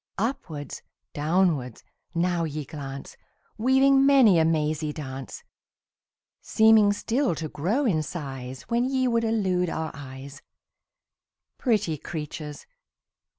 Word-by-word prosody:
Upwards, 190 - -4 0.3
downwards, 150 - 0 0.3
now 175 0 +1
ye 150 -2 -4
glance, 135 -1 -8 0.4
Weaving 270 +3 +4
many 260 -10 +6
a 160 - +4
mazy 155 -1 0
dance; 135 -3 -7 1.0
Seeming 220 -2 +5
still 235 - 0
to 155 0 -4
grow 200 - -1
in 170 -10 +2
size 135 -5 -6
When 235 +1 0
ye 260 -1 +1
would 230 -1 +1
elude 190 -6 +1
our 160 -1 -3
eyes 135 0 -10 1.2
Pretty 210 - 0
creatures! 150 -2 -7
165 Hz, 110 wpm, -26 LUFS, 145-225 Hz, 1.2 s, many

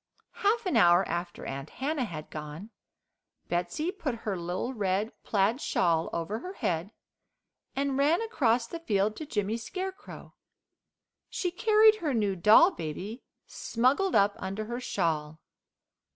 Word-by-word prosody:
Half 440 +2 +2
an 365 - 0
hour 175 -2 +5
after 175 +1 -4
Aunt 135 +2 -5
Hannah 280 -1 -2
had 155 -7 -8
gone 155 +7 -7 0.8
Betsey 180 - -1
put 290 -10 -3
her 205 -3 -1
little 180 +8 -3
red 205 -1 -1
plaid 215 +6 +1
shawl 165 -2 +1
over 180 +7 -3
her 365 +8 -7
head, 175 - -2 0.8
and 275 0 0
ran 300 +5 +4
across 250 - +1
the 330 +8 -7
field 210 -8 0
to 310 - -6
Jimmy 210 -3 -1
Scarecrow. 375 - -7 1.0
She 360 - -2
carried 435 +2 +5
her 305 - -1
new 205 -4 +1
doll 215 - +7
baby 190 - -6 0.2
smuggled 270 +11 +1
up 200 0 +4
under 195 +3 -4
her 240 +2 -4
shawl. 160 -9 -2
220 Hz, 135 wpm, -29 LUFS, -, 1.0 s, doll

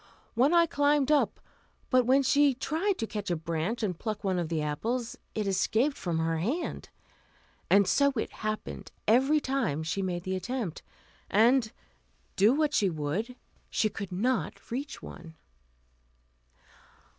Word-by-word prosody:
One 255 +6 +3
Eye 340 -1 +6
climbed 290 -2 +2
up, 295 - +2 0.5
but 255 -2 +4
when 270 +2 +5
she 280 0 +4
tried 340 +9 -1
to 225 - -2
catch 210 -2 -5
a 175 - +1
branch 165 +8 -2
and 180 -5 -2
pluck 215 -2 -4
one 190 -2 0
of 170 -2 -2
the 165 -2 -1
apples, 225 - -2 0.2
it 215 - -1
escaped 220 +8 +1
from 170 -3 -2
her 165 0 0
hand, 255 - -3 0.8
and 200 -1 +5
so 280 0 +4
it 220 - -2
happened 215 0 -5 0.2
every 265 +7 +4
time 260 - -1
she 160 +5 -2
made 180 -2 -2
the 190 0 -2
attempt, 215 -3 -4 0.5
and, 230 +2 +4 0.6
do 205 +4 +5
what 300 +2 +1
she 200 -8 +3
would, 170 - -3 0.3
she 215 - +1
could 200 -2 -6
not 230 +7 -2
reach 280 +5 -5
one. 165 -2 -10
220 Hz, 150 wpm, -29 LUFS, 180-270 Hz, 0.8 s, Eye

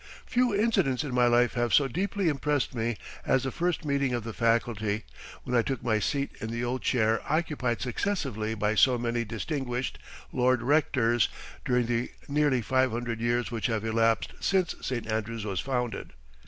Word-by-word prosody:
Few 245 -3 +2
incidents 195 - +2
in 140 -4 -4
my 125 -1 +4
life 120 0 +3
have 120 -1 +2
so 140 - +4
deeply 195 - -1
impressed 145 -2 0
me 115 -2 -1 0.3
as 130 -1 +2
the 135 - -2
first 175 0 -1
meeting 140 -3 +1
of 120 - -3
the 115 0 -5
faculty, 110 -2 0 0.4
when 125 - -2
I 120 - +5
took 130 0 -3
my 110 -3 +2
seat 140 +6 -1
in 110 - -3
the 115 +1 -3
old 125 +1 -2
chair 115 -2 +2
occupied 150 -7 0
successively 125 - -2
by 105 0 +1
so 125 +3 +4
many 120 0 -1
distinguished 125 +2 -3 0.3
Lord 125 -1 +2
Rectors 120 -5 +2 0.3
during 125 -1 +2
the 120 +1 -1 0.2
nearly 145 -4 +2
five 130 +2 +2
hundred 115 0 -3
years 120 +1 0
which 115 -2 -1
have 110 -2 -1
elapsed 115 0 +1
since 190 -3 +1
St. 120 -3 -3
Andrews 110 0 -3
was 95 -4 -2
founded. 125 0 -3
120 Hz, 175 wpm, -28 LUFS, 115-140 Hz, 0.4 s, I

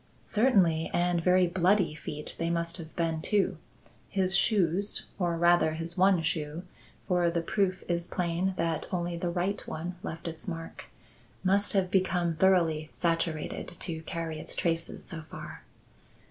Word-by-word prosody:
"Certainly; 190 -9 +3
and 175 -1 +2
very 180 +1 +5
bloody 180 0 +2
feet 150 -1 -5
they 165 0 0
must 170 0 -1
have 160 -2 -10
been 165 -2 0
too. 195 -2 +1 0.5
His 190 -1 +2
shoes 195 -1 +2
or 175 -2 +1
rather 170 -2 +4
his 165 +1 -4
one 185 -2 +4
shoe 155 +1 -2 0.4
for 180 -2 +3
the 170 0 -1
proof 190 0 0
is 170 0 -1
plain 180 +2 -1
that 165 -1 -1
only 175 -1 -1
the 175 +1 -2
right 185 +3 -1
one 175 +3 -5
left 165 +2 -6
its 160 +2 -7
mark 165 -2 -6 0.6
must 200 +2 +3
have 190 -2 +1
become 180 -3 +1
thoroughly 165 -3 +3
saturated 165 -2 -2
to 160 -3 -4
carry 165 -1 -4
its - - -2
traces 165 -1 -1
so 165 - -5
far." - - -8
170 Hz, 150 wpm, -29 LUFS, 165-185 Hz, 0.6 s, very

